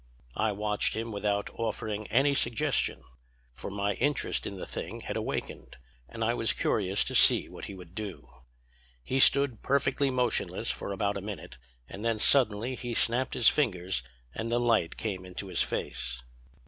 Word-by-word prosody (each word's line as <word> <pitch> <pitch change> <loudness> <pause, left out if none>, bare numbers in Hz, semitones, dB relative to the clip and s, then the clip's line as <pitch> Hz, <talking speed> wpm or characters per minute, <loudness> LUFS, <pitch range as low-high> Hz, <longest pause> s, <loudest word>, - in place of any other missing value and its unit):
"I 110 0 +1
watched 105 0 0
him 115 +1 -3
without 100 0 -1
offering 110 -2 -3
any 140 +4 +3
suggestion, 120 -5 +1 0.5
for - - -7
my 100 +1 -1
interest 140 +8 0
in 100 - -6
the - - -6
thing - - -6
had - - -5
awakened - - -4 0.3
and 115 -1 -4
I 115 +1 +2
was 115 -2 +2
curious 100 -1 +1
to - - -3
see - - +6
what - - -9
he 100 - -8
would 90 -2 -12
do. 105 -2 -6 0.8
He 130 - -1
stood 140 -3 +5
perfectly 140 0 +1
motionless 125 -2 0
for - - -5
about 100 0 -1
a - - -5
minute; 100 -9 -8 0.3
and 100 - -8
then 115 -1 +1
suddenly 115 0 +3
he 120 -2 -4
snapped 125 +4 +2
his 120 - +3
fingers 95 - +2 0.3
and 115 +1 -4
the 120 - +2
light 115 -9 +1
came 95 -4 -3
into 90 +2 -7
his 90 - 0
face. 60 -1 -2
110 Hz, 170 wpm, -29 LUFS, 100-120 Hz, 0.8 s, see